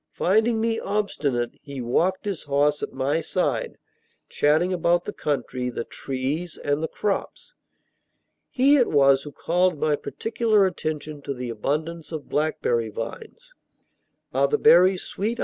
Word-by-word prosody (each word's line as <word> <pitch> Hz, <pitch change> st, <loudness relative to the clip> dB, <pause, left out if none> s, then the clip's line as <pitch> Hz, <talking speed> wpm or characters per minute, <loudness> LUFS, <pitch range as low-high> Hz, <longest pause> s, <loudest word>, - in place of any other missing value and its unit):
Finding 220 Hz, +4 st, +2 dB
me 225 Hz, 0 st, 0 dB
obstinate, 145 Hz, -, -1 dB
he 140 Hz, -2 st, -8 dB
walked 175 Hz, -, 0 dB
his 200 Hz, -5 st, -3 dB
horse 145 Hz, +1 st, +1 dB
at -, -, -4 dB
my 140 Hz, +5 st, 0 dB
side, 190 Hz, -, -1 dB, 0.5 s
chatting 160 Hz, +5 st, +2 dB
about 175 Hz, 0 st, +1 dB
the -, -, -5 dB
country, 125 Hz, -3 st, -2 dB
the 120 Hz, -, -4 dB
trees, 140 Hz, +9 st, -4 dB
and 145 Hz, +1 st, -1 dB
the 160 Hz, -, -1 dB
crops. 200 Hz, +3 st, -3 dB, 1.0 s
He 275 Hz, +3 st, +4 dB
it 250 Hz, -, +3 dB
was 140 Hz, -2 st, +4 dB
who 145 Hz, -, -9 dB
called 180 Hz, +2 st, +1 dB
my 150 Hz, 0 st, +2 dB
particular 220 Hz, +3 st, +1 dB
attention 155 Hz, -4 st, -4 dB
to 140 Hz, -, -4 dB
the 125 Hz, -1 st, -5 dB
abundance 155 Hz, +8 st, -3 dB
of 155 Hz, -3 st, -6 dB
blackberry 120 Hz, -7 st, 0 dB
vines. 455 Hz, -, -8 dB, 0.8 s
"Are -, -, +3 dB
the 445 Hz, -, +1 dB
berries 185 Hz, -, +5 dB
sweet?" 225 Hz, +4 st, -3 dB
160 Hz, 145 wpm, -24 LUFS, 140-195 Hz, 1.0 s, berries